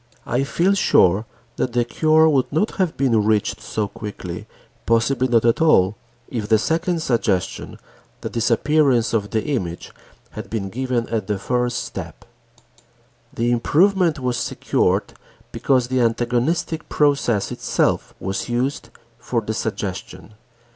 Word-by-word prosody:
I 125 +3 0
feel 175 +7 +1
sure 105 - +3 0.3
that 125 - -1
the 120 -1 +2
cure 155 +5 +3
would 140 -5 +1
not 160 +9 +1
have 185 -5 0
been 120 -6 +2
reached 105 -1 0
so 105 -2 -2
quickly, 95 -4 -7 0.4
possibly 125 +3 +2
not 115 -2 +2
at 115 +6 +2
all, 105 - +4 0.3
if 110 -4 -4
the 110 - +5
second 165 - -1
suggestion, 110 - -1 0.4
the - - -4
disappearance 120 +1 +2
of 105 -2 0
the 110 -2 -1
image, 95 - -3 0.4
had - - -8
been 100 -4 -3
given 125 +1 -2
at 110 -4 -2
the 105 - -1
first 125 +3 -1
step. - - -8 1.1
The 120 +1 0
improvement 170 - +3
was 125 -2 -2
secured - - 0 0.4
because 130 -3 +1
the 130 -1 +1
antagonistic 120 +8 0
process 140 -8 +1
itself - - -1
was 95 +5 -3
used 125 +4 -2 0.3
for 120 0 -1
the 110 0 -4
suggestion. 105 -1 -5
120 Hz, 135 wpm, -21 LUFS, 110-145 Hz, 1.1 s, the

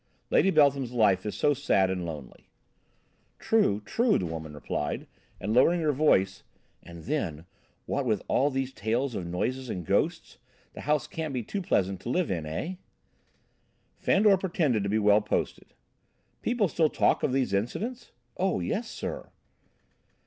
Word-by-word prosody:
Lady 195 - +4
Beltham's 140 -6 +3
life 105 -4 +3
is 105 - -3
so 145 - +3
sad 95 -7 +2
and 90 -2 -3
lonely." 75 -6 -9 0.9
"True 155 - +2
enough," 235 -1 +3
the 90 - -2
woman 80 -2 -6
replied, 75 0 -3 0.3
and, 105 +3 -2
lowering 165 +9 +5
her 155 -2 +2
voice: 100 -10 +2 0.4
"And 85 -1 -11
then, 85 - -3 0.4
what - - -1
with - - 0
all 140 +3 +2
these 135 -1 -2
tales 120 +4 -1
of 90 -5 -4
noises 125 +9 -2
and 90 -5 -4
ghosts, - - -1 0.3
the - - -8
house 150 0 +1
can't 155 -4 -5
be 125 - -2
too 195 - -4
pleasant 95 - 0
to 105 - -7
live 175 - 0
in, 80 -4 -3
eh?" 160 - -4 1.2
Fandor 200 -1 +4
pretended 165 - 0
to 100 - -2
be 105 - +1
well 105 0 +4
posted. - - -3 0.7
"People 235 -4 +1
still 160 -1 +2
talk - - +2
of - - +1
these 130 -6 0
incidents?" 220 - -3 0.3
"Oh, 190 - +1
yes, 205 - -2
sir." - - -6
125 Hz, 155 wpm, -28 LUFS, 95-155 Hz, 1.2 s, lowering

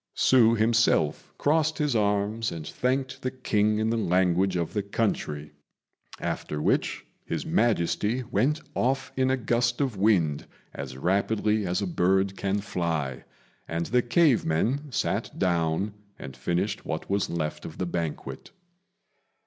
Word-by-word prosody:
Hsü 115 -3 +5
himself 110 -8 +2
crossed 155 +1 +2
his 150 -4 0
arms 105 +1 +1
and 80 -2 -6
thanked 130 - -2
the 130 - -1
King 105 -4 +1
in 110 +1 +1
the 115 - +1
language 90 -1 +2
of 85 -2 -2
the 105 - 0
country, 95 -8 -2 0.7
after 75 - -3
which - - 0 0.2
His - - -3
Majesty 110 +2 +1
went 135 +8 0
off 130 +1 0
in 130 0 +2
a 130 - +2
gust 120 0 0
of 130 -7 -1
wind 90 -8 +2 0.3
as 65 -2 -7
rapidly 105 +5 +1
as 90 +3 0
a - - 0
bird 95 +2 +1
can 100 +1 -1
fly, 80 -10 -2 0.4
and 85 +1 -2
the 125 +6 +2
cave 130 +1 +3
men 120 - 0
sat - - -2
down 85 +2 0 0.2
and 65 -1 -9
finished 85 +9 -1
what 80 -1 -4
was 100 0 0
left 75 -2 -3
of 80 - -8
the 90 - -1
banquet. 85 -3 -4
100 Hz, 145 wpm, -27 LUFS, 85-120 Hz, 0.7 s, Hsü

